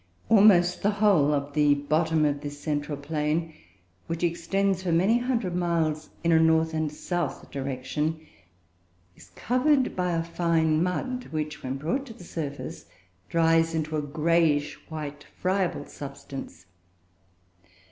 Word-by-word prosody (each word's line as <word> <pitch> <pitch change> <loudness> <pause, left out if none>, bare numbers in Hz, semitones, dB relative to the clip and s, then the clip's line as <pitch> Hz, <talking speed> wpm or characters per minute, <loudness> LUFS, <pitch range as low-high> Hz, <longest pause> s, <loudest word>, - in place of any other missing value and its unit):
Almost 195 -5 +5
the 205 - +3
whole 195 -9 +4
of 145 -1 -1
the 145 -1 +4
bottom 155 +2 +1
of 145 -1 0
this 145 0 -7
central 145 -1 -2
plain 155 +2 -2 0.5
(which 165 +1 -3
extends 185 +3 0
for 185 -2 -1
many 190 +8 +3
hundred 235 -8 -1
miles 160 -3 0
in 170 - +2
a 160 - +6
north 160 0 +3
and 155 -1 -1
south 175 0 -4
direction) 140 +4 -2 1.0
is - - -17
covered 255 +2 +2
by 180 -1 0
a 165 0 0
fine 165 -2 +1
mud, 250 +8 -2
which, 150 -1 -4
when 130 +1 -3
brought 255 - -2
to 230 - -9
the 180 - -13
surface, 150 -5 -6 0.4
dries 165 0 +3
into 155 -1 -2
a 150 - 0
greyish 155 0 +1 0.2
white 150 -2 -6
friable 185 -1 0
substance. 135 - -9
160 Hz, 135 wpm, -26 LUFS, 150-175 Hz, 1.0 s, a